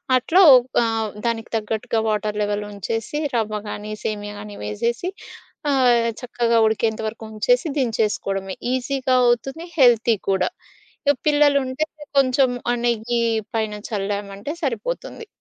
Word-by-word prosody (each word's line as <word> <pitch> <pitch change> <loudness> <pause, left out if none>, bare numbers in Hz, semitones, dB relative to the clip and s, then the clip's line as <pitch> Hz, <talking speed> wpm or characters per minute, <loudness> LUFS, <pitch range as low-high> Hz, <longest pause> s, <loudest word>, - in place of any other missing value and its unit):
అట్లో 325 +9 +4 0.2
ఒక్ 245 +1 -1 0.2
ఆహ్ 225 -1 -1 0.2
దానికి 230 -1 -1
తగ్గట్టుగా 220 +1 -2
వాటర్ 210 0 -1
లెవెల్ 205 0 -1
ఉంచేసి, 225 - -3 0.2
రవ్వ 215 -2 0
గానీ, 210 +1 -6
సేమియా 205 -1 -4
గానీ 205 0 -9
వేసేసి 235 - -2 0.6
ఆహ్, 245 -4 +4
చక్కగా 235 -2 0
ఉడికేంత 220 0 0
వరకు 225 +1 -7
ఉంచేసి 245 +7 +1
దించేసుకోవడమే. 205 -5 -1 0.2
ఈజీగా 260 0 0
అవుతుంది, 270 +7 0
హెల్తీ 240 -3 +5
కూడా. 190 -1 +2 0.6
ఇగా 285 - +5
పిల్లలుంటే 290 -1 +3 0.3
కొంచెం 260 0 +3 0.2
ఆహ్, 240 - 0
నెయ్యి 235 0 0 0.3
పైన 220 -1 -1 0.2
చల్లామంటే 200 +3 -3
సరిపోతుంది. 455 - -3
230 Hz, 120 wpm, -22 LUFS, 210-255 Hz, 0.6 s, హెల్తీ